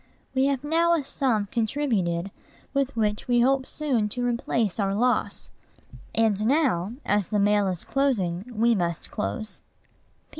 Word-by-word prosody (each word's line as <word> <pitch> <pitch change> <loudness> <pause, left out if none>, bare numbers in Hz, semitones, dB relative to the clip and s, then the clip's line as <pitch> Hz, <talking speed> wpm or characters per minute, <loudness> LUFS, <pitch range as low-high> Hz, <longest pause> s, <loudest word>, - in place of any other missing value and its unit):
We 265 +1 +3
have 275 -2 -1
now 335 +3 +3
a 310 - -1
sum 235 -6 0
contributed 215 -8 0 0.4
with 275 -2 0
which 210 -1 0
we 240 -1 +3
hope 265 +1 +2
soon 255 -9 -1
to 245 +3 -3
replace 235 -4 -1
our 195 -1 +1
loss. 245 +3 0 0.6
And 215 -2 +2
now, 240 - +1
as 205 -3 +1
the 210 - -1
mail 205 0 +3
is 180 -3 -3
closing, 220 -7 0
we 235 +1 +3
must 170 -5 -2
close. 100 - -4
225 Hz, 145 wpm, -25 LUFS, 200-265 Hz, 0.6 s, We